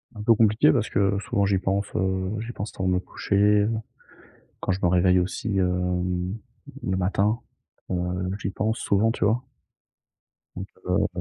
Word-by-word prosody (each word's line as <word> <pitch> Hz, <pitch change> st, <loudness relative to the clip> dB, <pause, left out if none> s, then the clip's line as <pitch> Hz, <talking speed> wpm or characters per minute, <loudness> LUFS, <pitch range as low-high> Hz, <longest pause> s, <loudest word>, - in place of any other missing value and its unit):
Un 105 Hz, -, -7 dB
peu 115 Hz, -, +6 dB
compliqué 110 Hz, -6 st, +4 dB
parce -, -, 0 dB
que, -, -, 0 dB
heu, 100 Hz, 0 st, +2 dB
souvent 100 Hz, 0 st, 0 dB
j'y 95 Hz, -1 st, +2 dB
pense, 95 Hz, +2 st, 0 dB
heu, 95 Hz, 0 st, 0 dB
j'y 115 Hz, +2 st, -5 dB
pense 105 Hz, -, -5 dB
avant 95 Hz, -, 0 dB
de 90 Hz, -, +2 dB
me 90 Hz, -, +2 dB
coucher. 105 Hz, +2 st, +2 dB, 0.9 s
Quand -, -, -1 dB
je 95 Hz, -, -1 dB
me -, -, +5 dB
réveille 90 Hz, +1 st, +4 dB
aussi, 95 Hz, +3 st, -2 dB
hem, 90 Hz, +1 st, 0 dB, 0.5 s
le 95 Hz, 0 st, -1 dB
matin. 100 Hz, +5 st, +1 dB, 0.5 s
Heu, 95 Hz, -, +1 dB, 0.4 s
j'y 95 Hz, -, -2 dB
pense 110 Hz, +3 st, -1 dB
souvent, 105 Hz, +3 st, +2 dB
tu 110 Hz, -, -1 dB
vois? 115 Hz, +5 st, +1 dB, 1.1 s
Donc, -, -, -6 dB, 0.2 s
heu -, -, +2 dB
95 Hz, 170 wpm, -25 LUFS, 90-105 Hz, 1.1 s, peu